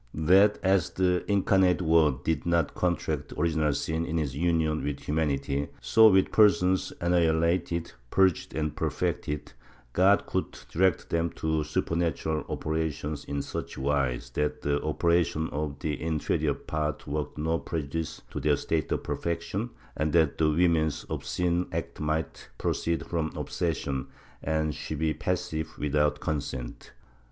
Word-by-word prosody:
That, 95 Hz, +7 st, +5 dB
as 95 Hz, -3 st, +3 dB
the 90 Hz, -1 st, +1 dB
Incarnate 95 Hz, -3 st, +3 dB
Word 80 Hz, -5 st, +3 dB
did 80 Hz, -2 st, 0 dB
not 85 Hz, -3 st, +2 dB
contract 85 Hz, -3 st, -1 dB
original 80 Hz, -1 st, +2 dB
sin 80 Hz, +3 st, -1 dB
in 80 Hz, 0 st, -2 dB
his 70 Hz, -5 st, -1 dB
union 80 Hz, -1 st, +1 dB
with 70 Hz, -1 st, -3 dB
humanity, 70 Hz, -2 st, -1 dB
so 110 Hz, 0 st, +6 dB
with 95 Hz, -1 st, +3 dB
persons 95 Hz, -3 st, +4 dB
annihilated, 85 Hz, 0 st, +1 dB, 0.2 s
purged 95 Hz, -5 st, +2 dB
and 75 Hz, -1 st, -1 dB
perfected, 75 Hz, -3 st, -2 dB, 0.4 s
God 95 Hz, +3 st, +4 dB
could -, -, -3 dB
direct 95 Hz, 0 st, +1 dB
them 85 Hz, 0 st, +1 dB
to 80 Hz, -1 st, 0 dB
supernatural 80 Hz, 0 st, -1 dB
operations 80 Hz, -2 st, -2 dB
in 70 Hz, -1 st, -3 dB
such -, -, -6 dB
wise 65 Hz, -3 st, -1 dB
that 75 Hz, +3 st, -2 dB
the 70 Hz, 0 st, +1 dB
operations 80 Hz, 0 st, +1 dB
of 75 Hz, -1 st, -3 dB
the 75 Hz, 0 st, -3 dB
inferior 80 Hz, -2 st, 0 dB
part 75 Hz, -1 st, -3 dB
worked 75 Hz, 0 st, -3 dB
no 80 Hz, +2 st, 0 dB
prejudice 80 Hz, 0 st, -4 dB
to -, -, -4 dB
their 75 Hz, -1 st, +3 dB
state 80 Hz, +1 st, -1 dB
of -, -, -1 dB
perfec 85 Hz, -1 st, -2 dB
tion, 110 Hz, +5 st, -3 dB, 0.3 s
and 80 Hz, 0 st, -1 dB
that 80 Hz, -4 st, +3 dB
the 80 Hz, -1 st, +4 dB
woman's 80 Hz, -1 st, +2 dB
obscene 90 Hz, 0 st, -1 dB
acts -, -, -4 dB
might 80 Hz, +1 st, -2 dB
proceed 85 Hz, -3 st, -1 dB
from 80 Hz, -2 st, -2 dB
obsession, 70 Hz, -5 st, -2 dB, 0.3 s
and 80 Hz, 0 st, 0 dB
she 80 Hz, -, -5 dB
be 80 Hz, +1 st, 0 dB
passive 80 Hz, +1 st, -3 dB
without 75 Hz, 0 st, +1 dB
consent 70 Hz, -6 st, -4 dB
80 Hz, 140 wpm, -28 LUFS, 75-85 Hz, 0.4 s, so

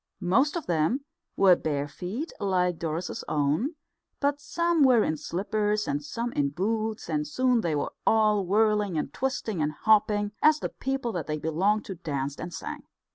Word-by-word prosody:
Most 230 Hz, -, +2 dB
of 340 Hz, -, -3 dB
them 175 Hz, -, 0 dB, 0.3 s
were 190 Hz, -2 st, +6 dB
bare 145 Hz, -3 st, -2 dB
feet, 205 Hz, -, -5 dB
like 180 Hz, -3 st, +1 dB
Doris's 165 Hz, +2 st, -3 dB
own, 155 Hz, -, 0 dB, 0.4 s
but 285 Hz, 0 st, 0 dB
some 340 Hz, +1 st, +1 dB
were 250 Hz, -5 st, +6 dB
in 155 Hz, -, 0 dB
slippers 210 Hz, +6 st, -1 dB
and 145 Hz, +1 st, -1 dB
some 235 Hz, +10 st, -4 dB
in 140 Hz, -1 st, +1 dB
boots, 215 Hz, +7 st, -2 dB
and 150 Hz, -2 st, -1 dB
soon 250 Hz, -, +2 dB
they 165 Hz, -5 st, 0 dB
were 145 Hz, -, -2 dB
all 215 Hz, -2 st, +4 dB
whirling 210 Hz, -1 st, +2 dB
and 145 Hz, -2 st, -3 dB
twisting 230 Hz, -8 st, -2 dB
and 150 Hz, 0 st, +1 dB
hopping, 205 Hz, +2 st, +2 dB
as 305 Hz, 0 st, +5 dB
the -, -, -3 dB
people 270 Hz, -3 st, -3 dB
that 175 Hz, -6 st, -4 dB
they 155 Hz, 0 st, -1 dB
belonged 185 Hz, +8 st, +1 dB
to 195 Hz, -, -5 dB
danced 140 Hz, -5 st, -4 dB
and 175 Hz, -, -5 dB
sang. -, -, -6 dB
200 Hz, 175 wpm, -27 LUFS, 160-230 Hz, 0.4 s, were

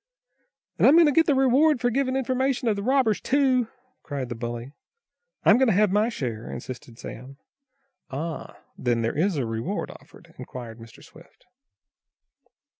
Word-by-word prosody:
"And -, -, +6 dB
I'm 285 Hz, -, +7 dB
going 335 Hz, 0 st, +7 dB
to 295 Hz, -, +4 dB
get 325 Hz, +3 st, +3 dB
the 290 Hz, -, +3 dB
reward 270 Hz, +3 st, +4 dB
for 245 Hz, +1 st, +1 dB
giving 260 Hz, +1 st, 0 dB
information 260 Hz, 0 st, 0 dB
of 215 Hz, -, +2 dB
the 200 Hz, -, -4 dB
robbers, 255 Hz, -1 st, +2 dB
too!" 260 Hz, -3 st, +2 dB, 0.3 s
cried 140 Hz, -4 st, -5 dB
the -, -, -3 dB
bully. 120 Hz, +2 st, -5 dB, 0.7 s
"I'm -, -, +6 dB
going 265 Hz, -, +4 dB
to 215 Hz, -, +3 dB
have 210 Hz, -1 st, +3 dB
my 210 Hz, +3 st, +2 dB
share!" 120 Hz, -, -5 dB
insisted 120 Hz, -2 st, -8 dB
Sam. 130 Hz, +4 st, -9 dB, 0.7 s
"Ah, 155 Hz, +4 st, -5 dB, 0.2 s
then 120 Hz, -2 st, 0 dB
there 115 Hz, -, -1 dB
is 170 Hz, +3 st, +1 dB
a 135 Hz, -, 0 dB
reward 115 Hz, 0 st, -3 dB
offered?" -, -, -17 dB
inquired 120 Hz, -2 st, -8 dB
Mr. 115 Hz, +1 st, -14 dB
Swift. 165 Hz, +9 st, -18 dB
205 Hz, 165 wpm, -25 LUFS, -, 0.7 s, I'm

